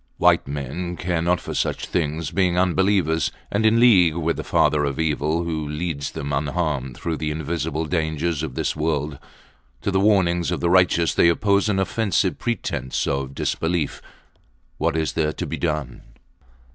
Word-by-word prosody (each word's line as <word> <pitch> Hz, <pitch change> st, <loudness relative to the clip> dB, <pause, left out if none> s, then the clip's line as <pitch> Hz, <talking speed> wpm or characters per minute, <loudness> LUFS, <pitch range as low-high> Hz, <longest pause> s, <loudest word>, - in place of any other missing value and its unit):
White -, -, +3 dB
men 75 Hz, +6 st, -4 dB
care 85 Hz, -2 st, -1 dB
not 85 Hz, +1 st, +1 dB
for -, -, -6 dB
such -, -, -1 dB
things, 80 Hz, -2 st, -2 dB
being 90 Hz, -3 st, +1 dB
unbelievers 90 Hz, -3 st, +2 dB, 0.2 s
and 110 Hz, +2 st, +2 dB
in 115 Hz, +1 st, +4 dB
league 95 Hz, -10 st, +6 dB
with 85 Hz, -1 st, 0 dB
the -, -, -4 dB
Father 75 Hz, -1 st, +2 dB
of 70 Hz, -2 st, -2 dB
Evil, 80 Hz, +1 st, 0 dB
who 80 Hz, -3 st, -3 dB
leads 75 Hz, -1 st, -3 dB
them 70 Hz, 0 st, -4 dB
unharmed 70 Hz, -3 st, -2 dB
through 80 Hz, +2 st, -3 dB
the 75 Hz, -, -2 dB
invisible 80 Hz, 0 st, -2 dB
dangers 80 Hz, -1 st, -1 dB
of 75 Hz, -5 st, -5 dB
this -, -, -1 dB
world. 75 Hz, -2 st, -2 dB, 0.6 s
To 100 Hz, -, 0 dB
the 95 Hz, -, +2 dB
warnings 90 Hz, -5 st, +2 dB
of 90 Hz, -, -1 dB
the 85 Hz, -, +1 dB
righteous 90 Hz, -2 st, +3 dB
they 85 Hz, -, +5 dB
oppose 100 Hz, +4 st, +2 dB
an 100 Hz, -, +1 dB
offensive 95 Hz, -1 st, 0 dB
pretence 95 Hz, -, -2 dB
of 70 Hz, -1 st, -2 dB
disbelief. 80 Hz, -3 st, -1 dB, 0.8 s
What 80 Hz, -1 st, +1 dB
is 80 Hz, -2 st, -1 dB
there 75 Hz, -1 st, 0 dB
to -, -, -4 dB
be -, -, -4 dB
done? 75 Hz, -6 st, -3 dB
80 Hz, 170 wpm, -22 LUFS, 75-90 Hz, 0.8 s, league